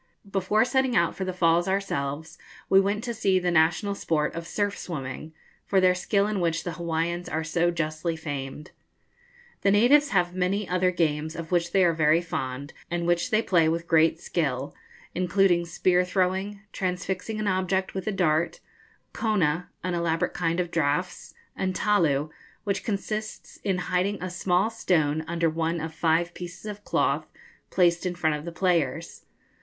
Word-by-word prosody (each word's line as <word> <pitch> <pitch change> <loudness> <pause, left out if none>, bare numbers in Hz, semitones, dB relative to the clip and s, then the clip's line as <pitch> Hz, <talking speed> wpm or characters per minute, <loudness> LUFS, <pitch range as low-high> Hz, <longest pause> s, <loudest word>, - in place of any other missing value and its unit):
Before 200 +3 +2
setting 265 -1 +1
out 170 -5 +3
for 190 - -3
the 185 - -2
Falls 170 -1 +2
ourselves, 160 -5 -2 0.3
we 195 - +7
went 205 +3 -1
to 240 - -3
see 195 -4 +2
the 180 -1 0
national 170 +5 +2
sport 155 -6 -1
of 165 0 -6
surf 205 +2 -1
swimming, 150 -2 -6 0.3
for 195 - +2
their 185 -1 +5
skill 200 +2 +1
in 210 -1 -1
which 170 -1 0
the 175 - -3
Hawaiians 170 +1 -2
are 160 +1 -2
so 170 +2 +1
justly 165 0 -2
famed. 145 0 -6 0.9
The 200 - +3
natives 255 +8 +5
have 180 -2 +1
many 185 +2 0
other 180 0 +2
games 160 -2 -1
of 165 0 -7
which 175 -1 +1
they 190 0 +4
are 170 - +3
very 160 0 +4
fond, 140 -4 -5 0.2
and 175 -1 -2
which 175 0 +1
they 220 +1 +2
play 165 -4 +3
with 170 +1 -2
great 160 0 +4
skill, 140 -6 -2 0.4
including 180 -1 +2
spear 180 +1 +2
throwing, 190 +2 -1
transfixing 185 +3 -3
an 215 - -2
object 190 0 0
with 190 0 -5
a - - +2
dart, 170 -4 +1 0.5
kona, 180 -7 0
an 185 - -1
elaborate 170 -1 0
kind 170 0 -1
of 175 -1 -1
draughts, 165 +3 -1 0.2
and 185 -1 -2
talu, 155 -8 +2 0.3
which 200 -2 -2
consists 215 +1 -4
in 190 -2 -1
hiding 180 +3 0
a 185 0 -5
small 180 +4 +1
stone 160 -8 +1
under 170 0 0
one 165 +1 -1
of 160 0 -5
five 170 +2 +1
pieces 175 +3 -9
of 210 -1 -7
cloth, - - 0 0.4
placed 175 0 +2
in 180 - -3
front 160 -3 +1
of 150 +1 -7
the 170 - -5
players. 165 -3 -1
175 Hz, 170 wpm, -26 LUFS, 165-190 Hz, 0.9 s, we